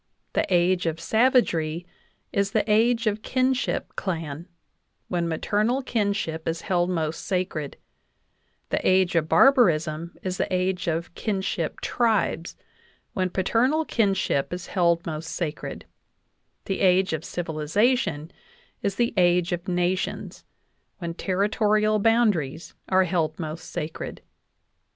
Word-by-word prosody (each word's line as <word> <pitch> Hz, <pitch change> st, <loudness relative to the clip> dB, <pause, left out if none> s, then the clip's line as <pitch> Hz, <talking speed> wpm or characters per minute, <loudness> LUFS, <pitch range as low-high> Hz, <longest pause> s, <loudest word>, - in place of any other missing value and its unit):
The -, -, 0 dB
age 175 Hz, 0 st, +3 dB
of 165 Hz, 0 st, -2 dB
savagery 175 Hz, -7 st, +2 dB, 0.5 s
is 200 Hz, 0 st, 0 dB
the 215 Hz, -1 st, +1 dB
age 230 Hz, +2 st, +3 dB
of 215 Hz, 0 st, 0 dB
kinship 255 Hz, +2 st, 0 dB
clan, 165 Hz, -3 st, -4 dB, 0.6 s
when 175 Hz, -2 st, 0 dB
maternal 215 Hz, -, 0 dB
kinship 200 Hz, -9 st, -1 dB
is 165 Hz, 0 st, -1 dB
held 175 Hz, -2 st, +1 dB
most 160 Hz, -3 st, -2 dB
sacred; 180 Hz, -6 st, -2 dB, 0.9 s
the -, -, 0 dB
age 185 Hz, -1 st, +3 dB
of 160 Hz, -1 st, +1 dB
barbarism 170 Hz, -, +3 dB
is 185 Hz, -1 st, -2 dB
the -, -, -2 dB
age 185 Hz, 0 st, 0 dB
of 170 Hz, +1 st, -2 dB
kinship 190 Hz, -6 st, -2 dB
tribes, 220 Hz, -7 st, 0 dB, 0.6 s
when 185 Hz, -1 st, 0 dB
paternal 245 Hz, -, +1 dB
kinship 195 Hz, -, +1 dB
is 180 Hz, -1 st, -5 dB
held 170 Hz, -2 st, +1 dB
most 160 Hz, 0 st, -5 dB
sacred; 160 Hz, -4 st, -4 dB, 0.8 s
the 195 Hz, -, -2 dB
age 185 Hz, -1 st, +3 dB
of 160 Hz, 0 st, -3 dB
civilization 165 Hz, -, 0 dB, 0.5 s
is 200 Hz, -1 st, -1 dB
the 235 Hz, +2 st, +1 dB
age 175 Hz, 0 st, +3 dB
of 175 Hz, +2 st, -3 dB
nations, 180 Hz, +1 st, -2 dB, 0.5 s
when 170 Hz, -3 st, -4 dB
ter 185 Hz, +1 st, -3 dB
ritorial 215 Hz, -1 st, +2 dB
boundaries 200 Hz, -, +1 dB, 0.2 s
are 190 Hz, 0 st, +4 dB
held 165 Hz, -3 st, -1 dB
most 160 Hz, 0 st, -6 dB
sacred. 155 Hz, +1 st, -5 dB
180 Hz, 125 wpm, -25 LUFS, 165-210 Hz, 0.9 s, are